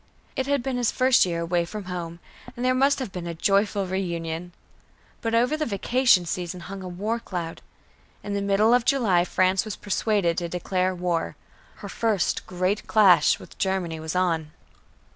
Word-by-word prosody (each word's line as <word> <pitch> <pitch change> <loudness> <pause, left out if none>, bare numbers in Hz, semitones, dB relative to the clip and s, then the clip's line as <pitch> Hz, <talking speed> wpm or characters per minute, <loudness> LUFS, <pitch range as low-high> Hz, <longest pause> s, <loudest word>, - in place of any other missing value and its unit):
It 265 -1 -2
had 280 -3 +1
been 260 -1 -2
his 245 -2 +1
first 255 -6 +4
year 170 -1 -2
away 170 +1 0
from 210 +4 -6
home, 175 -2 -6 0.4
and 245 - -3
there 255 - +3
must 275 +2 +3
have 260 -7 -5
been 175 -2 -6
a 170 - -4
joyful 200 +2 +1
reunion. 175 -2 -3 0.7
But 230 0 -1
over 245 +6 +3
the 310 - -1
vacation 235 -2 +3
season 180 +1 -4
hung 195 +2 -8
a 185 - -6
war 205 +6 -2
cloud. 175 -7 -6 0.6
In 205 - -4
the 200 - -1
middle 200 +3 +3
of 245 -1 +4
July, 215 -10 +3
France 185 +1 +2
was 215 -3 -5
persuaded 200 -4 0
to 170 -1 -4
declare 185 +1 -1
war. 175 -2 -2 0.4
Her - - -9
first 215 -6 0
great 185 +3 -1
clash 200 -5 +5
with - - -15
Germany 185 -4 -1
was 160 +2 -5
on. 165 -4 0
190 Hz, 180 wpm, -25 LUFS, 175-225 Hz, 0.7 s, clash